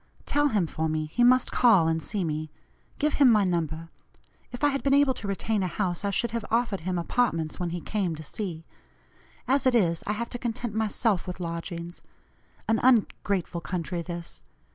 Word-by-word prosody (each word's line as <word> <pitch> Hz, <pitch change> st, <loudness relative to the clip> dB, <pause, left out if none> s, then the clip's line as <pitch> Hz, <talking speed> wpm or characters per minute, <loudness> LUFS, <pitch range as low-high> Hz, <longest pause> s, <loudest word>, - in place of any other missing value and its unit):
Tell 290 Hz, 0 st, +2 dB
him, 210 Hz, -10 st, +1 dB
for 160 Hz, 0 st, -2 dB
me, 155 Hz, 0 st, -1 dB
he 240 Hz, -, +3 dB
must 255 Hz, +1 st, +5 dB
call 210 Hz, -10 st, +5 dB
and 160 Hz, 0 st, 0 dB
see 195 Hz, +6 st, -2 dB
me; 155 Hz, -1 st, -3 dB, 0.5 s
give 300 Hz, 0 st, +1 dB
him 260 Hz, -3 st, +8 dB
my 210 Hz, -2 st, +4 dB
number. 165 Hz, -3 st, -2 dB, 0.6 s
If 245 Hz, -, -8 dB
I 290 Hz, -, +6 dB
had 275 Hz, -1 st, -1 dB
been 275 Hz, 0 st, +3 dB
able 280 Hz, -2 st, +4 dB
to 220 Hz, -, -7 dB
retain 200 Hz, +2 st, -1 dB
a 185 Hz, -, 0 dB
house, 180 Hz, 0 st, -2 dB
I 200 Hz, -, 0 dB
should 210 Hz, +4 st, 0 dB
have 230 Hz, -1 st, -3 dB
offered 230 Hz, -4 st, +1 dB
him 180 Hz, +2 st, -2 dB
apartments 170 Hz, -4 st, 0 dB
when 175 Hz, -1 st, -1 dB
he 175 Hz, 0 st, -4 dB
came 190 Hz, -5 st, -1 dB
to 155 Hz, -, -9 dB
C.; 165 Hz, 0 st, -5 dB, 0.8 s
as 270 Hz, +1 st, +2 dB
it 255 Hz, -, +3 dB
is, 170 Hz, -7 st, +2 dB
I 210 Hz, -, +1 dB
have 235 Hz, +2 st, -4 dB
to 245 Hz, -, -5 dB
content 240 Hz, -2 st, -3 dB
myself 215 Hz, -2 st, 0 dB
with 180 Hz, 0 st, -5 dB
lodgings. 170 Hz, 0 st, -5 dB, 0.7 s
An 225 Hz, 0 st, +2 dB
ungrateful 200 Hz, -7 st, +1 dB
country 175 Hz, +1 st, -3 dB
this! 170 Hz, 0 st, -7 dB
195 Hz, 195 wpm, -27 LUFS, 170-235 Hz, 0.8 s, him